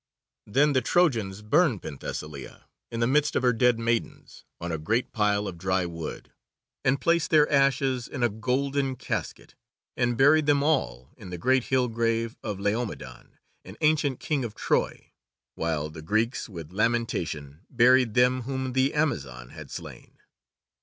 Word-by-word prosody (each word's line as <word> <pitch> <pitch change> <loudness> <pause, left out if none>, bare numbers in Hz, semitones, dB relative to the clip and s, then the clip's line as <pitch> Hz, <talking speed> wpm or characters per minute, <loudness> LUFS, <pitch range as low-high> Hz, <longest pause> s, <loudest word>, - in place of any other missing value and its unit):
Then 140 +7 +3
the 130 - +3
Trojans 115 - +1
burned 135 - +2
Penthesilea 75 -1 -7 0.3
in 115 - -4
the - - +4
midst 145 +4 +2
of - - +1
her 125 -1 +4
dead 120 +1 +3
maidens, 115 0 -3
on 85 0 -4
a 80 - -2
great 110 +11 -1
pile 105 -1 +1
of 85 -3 -7
dry 95 0 0
wood, 85 -2 -7 0.5
and 135 +2 +2
placed 170 +2 +1
their 150 -2 +5
ashes 135 -3 +2
in 130 - -4
a 120 - +4
golden 130 +5 -1
casket, - - -5 0.4
and 120 -1 0
buried 145 +3 +5
them 145 -1 +3
all 65 - 0
in 95 - -10
the 90 - -5
great 130 +7 +2
hill 130 -1 +1
grave 115 0 -1
of 105 -3 -4
Laomedon, 100 - -4 0.3
an 95 +4 -12
ancient 150 -4 +2
King 145 -4 -1
of 115 -3 -5
Troy, - - -1 0.4
while 80 -2 -2
the 80 - -9
Greeks 110 - -1
with 85 -4 -9
lamentation 90 -10 -1
buried 125 -2 +4
them 125 +1 +3
whom 130 0 -3
the 130 +2 +1
Amazon 70 - -2
had - - -11
slain. - - -10
115 Hz, 160 wpm, -26 LUFS, 95-135 Hz, 0.5 s, their